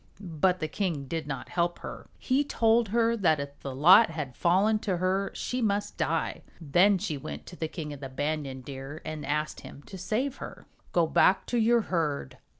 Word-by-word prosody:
But 180 0 0
the 155 - 0
king 165 -7 -2
did 160 +1 -4
not 135 -3 -5
help 175 0 0
her. - - -9
He 270 +2 +1
told 230 -4 +2
her 230 +1 +2
that 170 -8 +2
if 140 0 -7
the 135 -2 -6
lot 180 - +7
had 150 -6 -5
fallen 200 +5 +3
to 195 -4 -1
her 190 +2 0
she 250 0 -3
must 205 -2 0
die. - - -1 0.2
Then 180 +6 +4
she 180 -6 -3
went 75 - -7
to - - -10
the 160 - -3
King 155 -2 -6
of 145 - -9
the 135 -1 -7
Banyan 140 -1 -3
Deer 135 +3 -8
and 155 -1 -5
asked 150 +2 -2
him 140 - -12
to 190 - -10
save 245 +9 -1
her. - - -9 0.3
"Go 170 -2 +3
back 185 +4 +3
to 245 - -1
your 235 +1 +4
herd. 150 -9 -2
170 Hz, 200 wpm, -28 LUFS, 145-205 Hz, 0.3 s, lot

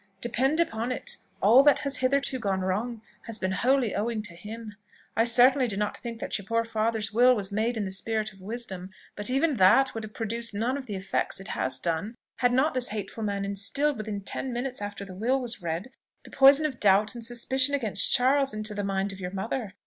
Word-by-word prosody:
Depend 265 +7 0
upon 235 -7 -1
it, 255 - -3 0.3
all 230 +7 +7
that 290 0 +4
has 280 -1 +2
hitherto 265 0 +1
gone 195 -4 -1
wrong, 215 +5 -2 0.2
has 225 -1 -3
been 185 -2 -2
wholly 245 +2 +1
owing 220 0 -2
to 210 -4 -5
him. 215 +5 -9 0.4
I 225 - +3
certainly 250 +2 +5
do 200 -4 -2
not 210 0 -1
think 235 -2 -7
that - - -2
your 200 - -11
poor 230 0 0
father's 220 -1 -1
will 250 +3 +5
was 200 -3 -3
made 225 +3 -1
in 210 - -2
the 190 - -4
spirit 215 +2 -1
of 190 - -18
wisdom; 195 -3 -5 0.3
but 205 +2 0
even 275 +2 +1
that 260 +8 +5
would 225 - -5
have 215 0 -10
produced 230 0 -2
none 235 +5 0
of 275 -2 -6
the 205 - -4
effects 190 0 -1
it 195 - -9
has 130 0 -1
done, 170 - -3 0.2
had 245 -1 +2
not 265 +5 +2
this 255 -1 0
hateful 215 +1 -5
man 200 -2 -2
instilled, 205 +9 0
within 215 -2 -5
ten 255 +6 -4
minutes 245 0 -3
after 205 0 -6
the 190 - -10
will 240 +8 0
was 240 -5 -4
read, 170 +8 -4 0.3
the - - -14
poison 275 +3 +6
of 270 -5 -3
doubt 205 +2 +3
and 235 -1 -7
suspicion 255 +4 +1
against 220 -7 +3
Charles, 270 0 +3
into 215 0 -1
the 205 0 -3
mind 195 0 -1
of 195 - -11
your 180 -1 -4
mother. 200 +2 -4
225 Hz, 220 wpm, -27 LUFS, 200-255 Hz, 0.4 s, all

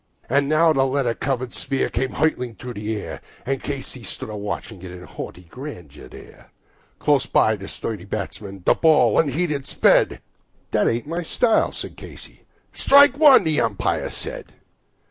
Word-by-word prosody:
And 140 +2 +1
now 160 +1 +4
the 135 -2 +2
leather 135 -3 0
covered 130 -1 -3
sphere 135 0 -1
comes 130 0 -2
hurtling 125 -7 0
through 125 +5 -8
the 110 0 -3
air, 100 - -7 0.2
And 135 0 -2
Casey 135 -2 -6
stands 110 0 -7
a - - -6
watching 105 -1 -5
it 95 - -8
in 90 0 -10
haughty 90 - -8
grandeur 85 - -10
there. - - -15 0.5
Close 145 -2 +2
by 110 - +3
the 100 -1 -9
sturdy 105 -5 -5
batsman 100 -1 -6
the - - +6
ball 150 -9 +4
unheeded 150 -1 0
sped - - +3 0.5
"That - - +2
ain't 115 +3 0
my 165 +4 -3
style," 225 +7 +2
said - - -7
Casey. - - -13 0.3
"Strike 280 0 +5
one," 290 -9 +8
the 160 -3 +1
umpire 110 -4 -1
said. - - -6
130 Hz, 165 wpm, -22 LUFS, 105-150 Hz, 0.5 s, one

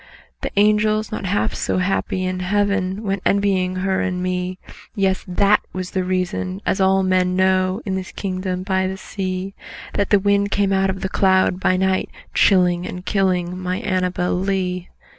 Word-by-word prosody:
The - - -2
angels, 215 +1 +3
not 215 -2 -4
half 200 +3 0
so - - -1
happy 185 0 0
in 185 0 -2
Heaven, 200 +1 0
Went 195 -2 -1
envying 195 -2 +1
her 190 +1 0
and 180 -1 -2
me; 185 0 -2 0.4
Yes! 195 -2 +1
that 200 +3 +3
was 185 -1 -4
the 185 - -1
reason 185 +1 -2
(as 190 - +1
all 190 0 +4
men 185 -1 +2
know, 185 +2 +2
In 195 - -2
this 190 -1 -4
kingdom 185 -1 -3
by 190 -1 0
the 190 0 -4
sea) 190 0 -4 0.4
That 200 - 0
the 205 - +6
wind 200 +1 +2
came 200 -1 +1
out 195 0 +2
of 190 0 -3
the - - -1
cloud, 190 -1 +2 0.7
chilling 180 -2 +3
And 180 +1 -7
killing 180 -3 0
my 185 0 -2
ANNABEL 185 -4 -1
LEE. 185 -2 -2
190 Hz, 165 wpm, -21 LUFS, 185-195 Hz, 0.7 s, the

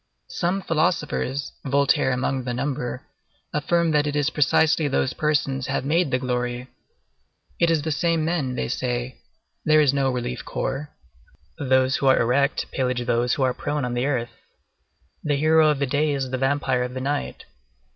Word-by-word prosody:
Some 185 +2 -1
philosophers—Voltaire 140 -4 0
among 130 +1 -1
the 120 -1 -3
number—affirm 145 +5 -3
that 150 -1 +2
it 145 - -2
is 145 +1 +1
precisely 155 +1 +3
those 130 -1 0
persons 145 -4 0
who - - -2
have - - -1
made 165 +2 +2
the 130 - +1
glory. 125 0 -3 0.9
It 170 - +3
is 160 -3 +1
the 160 - -2
same 165 +1 +1
men, 155 -7 -1
they - - -2
say; 125 0 -3 0.4
there 155 0 +4
is 145 -3 +4
no 135 -1 +1
relief 125 0 -4
corps; 135 +3 -3 0.7
those 130 -1 +2
who 135 - 0
are 130 - +5
erect 135 +4 +1
pillage 125 -2 -1
those 120 +1 +1
who 135 - 0
are 130 -1 +2
prone 145 0 -2
on 125 - -3
the 120 +2 0
earth. 120 -4 -1 0.9
The 145 -1 +1
hero 155 +2 +4
of 150 - +1
the 140 - 0
day 145 +2 +1
is 135 -2 -3
the 130 - -1
vampire 135 -1 +1
of 125 +1 -4
the - - -3
night. 130 - -3
135 Hz, 170 wpm, -23 LUFS, 125-150 Hz, 0.9 s, are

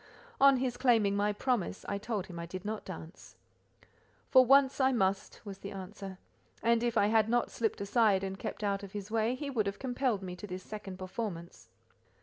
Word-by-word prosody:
On 275 -1 +7
his 250 -1 -1
claiming 225 -6 +3
my 205 +1 +2
promise, 215 -3 -1
I 200 - -2
told 210 -3 -3
him 175 -3 -8
I 170 - -5
did 185 +2 -7
not 215 0 -3
dance. 170 -2 -10 1.0
"For 260 -1 +8
once 270 +2 +5
I 260 0 +4
must," 195 -5 0
was 195 -1 -7
the 200 - -7
answer; 195 0 -8 0.5
and 235 0 +3
if 240 -1 0
I 205 - +5
had 220 0 +3
not 240 0 +1
slipped 225 -3 -1
aside 200 -2 +3
and 195 0 -4
kept - - -5
out 200 -1 0
of 200 -1 -10
his 205 0 -6
way, 225 +2 +1
he 280 +1 -5
would 215 -6 0
have 200 - -3
compelled 250 -5 -1
me 180 -1 -5
to 210 - -8
this 185 -1 -6
second 205 -3 -7
performance. 185 -2 -6
210 Hz, 200 wpm, -31 LUFS, 195-240 Hz, 1.0 s, For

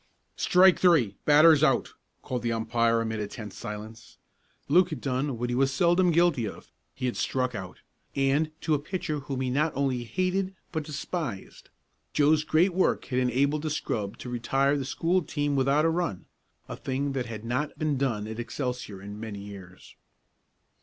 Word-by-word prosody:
"Strike 185 0 +5
three 150 - +4
batter's 155 0 +7
out!" 135 -5 +2 0.3
called 125 -2 -3
the 120 - -1
umpire 115 0 +1
amid 110 -1 -3
a 105 - -2
tense 105 -2 -8
silence. 110 0 -8 0.5
Luke 175 +5 +4
had 155 - -5
done 130 -1 -2
what 120 +1 -2
he - - 0
was 135 +1 +2
seldom 175 +6 +3
guilty 170 -8 +3
of; 90 - -10 0.2
he 130 - -4
had 125 - -1
struck 125 -1 -1
out, 95 -4 -7 0.3
and 140 +3 +2
to 160 0 0
a 150 - +2
pitcher 165 -1 -3
whom 135 -2 -4
he 130 -1 -1
not 150 +4 +1
only 135 -3 0
hated 185 +6 -1 0.2
but 160 -2 -2
despised. 150 - -5 0.4
Joe's 150 +1 +4
great 170 +5 +3
work 185 +1 +1
had 130 -1 -1
enabled 135 +4 +1
the 155 - -2
scrub 110 -7 -3
to 125 - -8
retire 135 +4 +1
the 140 -2 -2
school 170 +7 +1
team 145 -2 -2
without 140 +3 +3
a - - +4
run 165 - -2 0.4
a - - -6
thing 135 +2 -2
that 130 -3 -2
had 110 -1 -7
not 125 +6 -2
been 155 -2 0
done 125 -6 -1
at 110 +1 -6
Excelsior 120 -5 -4
in 105 +1 -8
many 110 -2 -6
years. 95 -3 -12
135 Hz, 180 wpm, -27 LUFS, 115-155 Hz, 0.5 s, batter's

